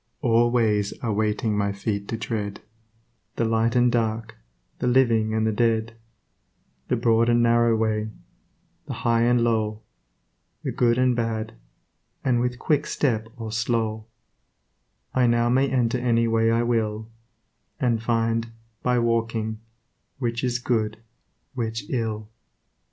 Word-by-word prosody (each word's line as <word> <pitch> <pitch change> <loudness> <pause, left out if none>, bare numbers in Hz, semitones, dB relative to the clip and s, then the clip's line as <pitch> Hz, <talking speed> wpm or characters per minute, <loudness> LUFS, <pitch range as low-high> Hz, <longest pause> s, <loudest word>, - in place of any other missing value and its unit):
All 120 -3 +3
ways 105 -4 +1
are 115 -3 0
waiting 110 +1 0
for 105 - 0
my 100 -1 +1
feet 100 0 -3
to 115 - -3
tread, 105 -3 -4 0.7
The 115 - 0
light 115 +1 +1
and 125 0 +4
dark, 115 -1 -1 0.4
the - - -1
living 115 -4 +3
and 110 0 +1
the 110 - +2
dead, 115 0 0 0.9
The - - +1
broad 115 0 +3
and 120 0 +4
narrow 115 0 +4
way, 110 -1 0 0.8
the - - -4
high 115 -1 +3
and 120 0 +3
low, 110 -2 0 0.8
The - - -2
good 120 -1 +2
and 130 -1 +3
bad, 115 -1 -2 0.7
and 125 -2 +2
with 125 0 -1
quick 150 +3 0
step 115 -6 0
or 110 -2 -6
slow, 110 -1 -1 1.1
I 125 -1 +3
now 120 0 +2
may 135 +2 +3
enter 125 -1 +1
any 115 -1 +2
way 115 0 +2
I 115 +1 +2
will, 110 -2 -1 0.7
And 120 -5 +1
find, 115 0 0 0.3
by 125 0 +1
walking, 115 -2 0 0.6
which 120 -2 -2
is 125 -1 +1
good, 110 -3 -1 0.6
which 115 +2 -3
ill. 110 -4 -2
115 Hz, 140 wpm, -24 LUFS, 110-120 Hz, 1.1 s, and